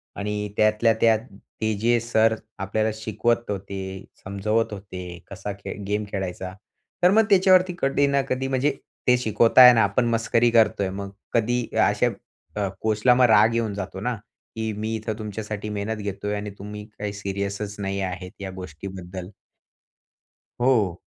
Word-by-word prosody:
आणि 105 0 -3
त्यातल्या 110 +1 +4
त्यात 110 -2 +5 0.4
ते 110 0 +1
जे 120 +1 +3
सर 110 -1 +2 0.2
आपल्याला 110 +3 0
शिकवत 110 +2 -1
होते, 95 -1 -5 0.2
समजवत 105 +3 -1
होते, 90 -3 -8
कसा 100 +1 -5
खे - - -6
गेम 105 +1 0
खेळायचा. 95 -1 -4 0.5
तर 180 - +7
मग 220 +2 +5
त्याच्यावरती 185 -2 +5
कधी 140 +1 +2
ना 140 0 +2
कधी, 130 +1 -1
म्हणजे 135 +2 +1 0.4
ते 125 0 +6
शिकवत 115 -1 +1
आहे 125 -1 +11
ना, 115 -2 +4
आपण 105 +5 +1
मस्करी 115 +1 +2
करतोय. 110 -4 +3
मग 100 +1 -5 0.2
कधी 120 +1 +1
या - - +4
अशा - - +2
ब - - -8 0.4
अ, 100 - +1
कोचला 110 +3 +3
राग 110 0 +5
येऊन 115 -3 0
जातो 95 -1 -5
ना, 125 +1 -1 0.4
की 110 -1 -2
मी 110 +2 -3
इथे 110 0 -3
तुमच्यासाठी 105 0 -5
मेहनत 105 +1 -3
घेतोय 105 +1 -3
आणि 105 0 -4
तुम्ही 105 +1 -7
काही 105 -1 -3
सीरियसच 100 +1 -4
नाही 100 0 -2
आहेत, 90 -1 -4
या 95 - -4
गोष्टीबद्दल. 95 +1 -8 1.3
हो. 110 -9 +2
105 Hz, 155 wpm, -24 LUFS, 100-115 Hz, 1.3 s, आहे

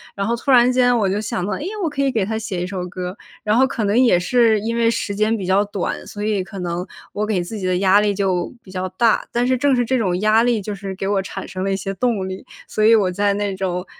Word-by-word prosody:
然 200 - -2
后 235 - 0
突 255 +4 -6
然 250 -1 +6
间 245 -1 +3
我 210 -4 +1
就 200 +3 -1
想 185 -4 -3
到， 210 - -3
哎 - - -4
呀， 345 - -4 0.2
我 325 - +1
可 280 -1 -3
以 275 - +2
给 215 -5 0
她 220 +2 -2
写 195 -5 -3
一 - - -2
首 180 -1 -4
歌， 180 +1 -6 0.3
然 210 +1 +2
后 265 +2 +4
可 235 -5 -3
能 205 +4 +2
也 235 -9 +5
是 225 +3 +3
因 230 +2 -2
为 230 -1 +3
时 205 -3 -2
间 215 +2 +1
比 190 - -5
较 190 +2 +3
短， 200 -2 -4
所 205 0 -6
以 210 -3 0
可 195 +1 -10
能 175 +1 -3 0.3
我 210 - -2
给 200 -5 0
自 210 +4 -6
己 185 - -2
的 180 -1 +1
压 195 +2 +4
力 205 -1 +1
就 190 -3 0
比 185 - -14
较 185 0 -3
大。 225 +5 +1
但 240 +1 +1
是 255 0 +2
正 280 +1 +2
是 245 -1 +1
这 260 +1 +1
种 180 -4 0
压 215 +1 +4
力， 235 -2 +2
就 205 +1 -5
是 195 -1 -6
给 195 - -4
我 200 -1 +1
产 190 - -7
生 185 0 -5
了 195 - 0
一 - - +1
些 195 +1 -4
动 200 -2 -1
力， 190 0 -6 0.2
所 215 - -1
以 225 +1 +7
我 190 -4 +2
在 200 +2 +1
那 205 -1 -2
种， 180 -1 -3
205 Hz, 315 characters per minute, -20 LUFS, 190-230 Hz, 0.3 s, 以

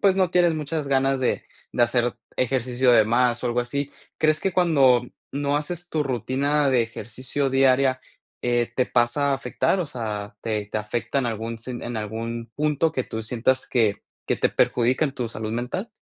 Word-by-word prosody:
pues, 195 -2 +4
no 185 -3 +2
tienes 175 -2 +3
muchas 155 0 -3
ganas 135 0 +2
de 130 - 0 0.3
de - - +2
hacer 120 0 +2 0.2
ejercicio 125 0 +2
de 110 - +6
más, 120 +2 +2
o - - 0
algo 120 0 0
así, 140 +4 -2 0.3
¿crees 155 0 +2
que 195 - -1
cuando 140 -9 +4 0.3
no 140 +1 0
haces 175 +4 -4
tu 155 -2 0
rutina 140 +3 +1
de 125 -2 +4
ejercicio 125 +5 -3
diaria, 135 0 +4 0.4
eh, 120 -1 +1
te 125 - +2
pasa 125 +4 +2
a - - +3
afectar? 135 +8 0
O 175 - -2
sea, 105 -5 -5
¿te 105 -2 -2
te 110 - -3
afecta 110 +6 -2
en 130 - 0
algún 115 0 -4
sen 120 +1 -7
en 120 -1 -4
algún 115 +2 -5
punto 150 +1 +1
que 130 - -1
tú 110 - -5
sientas 125 +3 0
que 110 -5 +1 0.2
que - - +1
te - - +2
perjudica 125 +5 +2
en 145 - 0
tu 125 -3 -3
salud 110 0 -5
mental? 125 - -3
125 Hz, 190 wpm, -24 LUFS, 115-145 Hz, 0.4 s, de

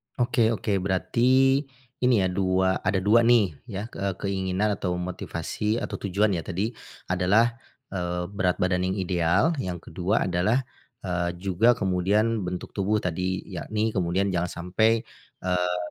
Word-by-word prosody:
Oke 120 -2 +2
oke, 100 -2 -1
berarti, 125 +8 +3 0.4
ini 125 -5 +3
ya 95 - +2
2, 95 0 +1
ada 95 -1 +1
2 110 +3 +5
nih 115 -7 +5 0.2
ya, 105 +1 -6
ke 95 -2 -3
keinginan 95 +1 0
atau 90 -2 -1
motivasi 90 +4 -3
atau - - -4
tujuan 100 +2 +1
ya 90 - 0
tadi, 95 +5 -2 0.4
adalah, 105 +6 +3 0.3
eee, 90 -2 -2
berat 95 -3 +1
badan 90 0 0
yang 95 - -1
ideal, 90 - +2
yang 90 -4 -3
ke-2 90 +6 0
adalah, 100 +9 +1 0.4
eee, 85 -1 -1
juga 95 +6 +2
kemudian 100 +2 +1
bentuk 90 0 -5
tubuh 105 +2 0
tadi, 90 +1 -2
yakni 105 +5 -2
kemudian 95 +1 0
jangan 90 0 -1 0.2
sampai, 110 +3 +3 0.4
eee, 90 -1 0
95 Hz, 145 wpm, -26 LUFS, 90-110 Hz, 0.4 s, 2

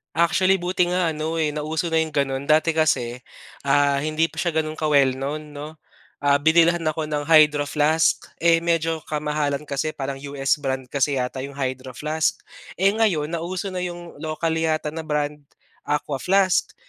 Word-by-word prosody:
Actually, 185 +3 +3
buti 180 0 0
nga 180 -1 +1
ano, 160 +2 -2
eh, 150 -2 0
nauso 155 +3 -2
na 165 - -1
'yong 160 -1 +1
gano'n, 135 -2 -1
dati 155 +2 +2
kasi, 130 -7 +1 0.5
ah, 140 0 +3
hindi 155 +3 0
pa 165 - -19
siya 175 +1 -1
gano'n 155 0 -3
ka-well 140 -4 +3
known, 150 +2 -5
'no? 150 +2 -8 0.4
Ah, 145 0 +3
binilhan 165 +3 +3
ako 155 0 -1
ng 150 -1 -2
Hydro 150 -1 +5
flask, 150 +2 +2 0.2
eh, 165 -1 +5
medyo 165 -1 0
kamahalan 150 -1 -1
kasi, 150 +2 -3
parang 135 0 -4
US 140 0 -1
brand 130 -2 -2
kasi 140 0 +1
yata 125 0 -2
'yong 140 +1 -6
Hydro 130 -2 -4
flask. 155 +1 0 0.4
Eh, 195 +2 +3
ngayon 190 -9 +1
nauso 175 +3 -3
na 185 - -3
'yong, 175 -3 -6
local 160 +1 -2
yata 155 -2 0
na 160 - -6
brand, 150 -1 -2 0.5
Aquaflask, 175 +6 +1
155 Hz, 165 wpm, -23 LUFS, 145-165 Hz, 0.5 s, Hydro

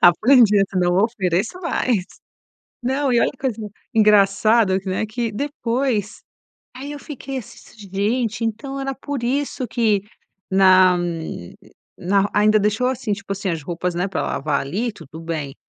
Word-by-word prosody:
Aprendi, 215 +4 +6
essa 195 -1 0
não 175 0 +2
ofereço 210 - -1
mais! 250 - 0 0.8
Não 265 +1 0
e 235 - +4
olha - - +2
que 265 - -19
coisa 260 -5 -2 0.4
engraçado 210 -1 +4
que, 190 - -8
né, 190 +4 -1
que 230 +1 -3
depois 240 -3 -2 0.5
aí 275 +3 -7
eu 295 - -7
fiquei 275 -2 -6
assim: 235 - -11 0.4
"Gente, 220 +3 0
então 270 +5 -4
era 270 0 -3
por 280 -1 -5
isso 265 +1 -1
que 215 -5 +1 0.5
na 185 -1 +6 1.0
na". 200 +2 +1
Ainda 215 +1 +4
deixou 210 +4 +1
assim, 255 -4 -2
tipo 200 0 -4
assim, 195 0 -3
as 165 -3 -3
roupas, 175 +2 -3
né, 180 +3 -1
pra - - -2
lavar 145 -1 -1
ali, 205 - -2
tudo 160 -4 -12
bem, 155 -4 -4
215 Hz, 155 wpm, -21 LUFS, 190-250 Hz, 1.0 s, Aprendi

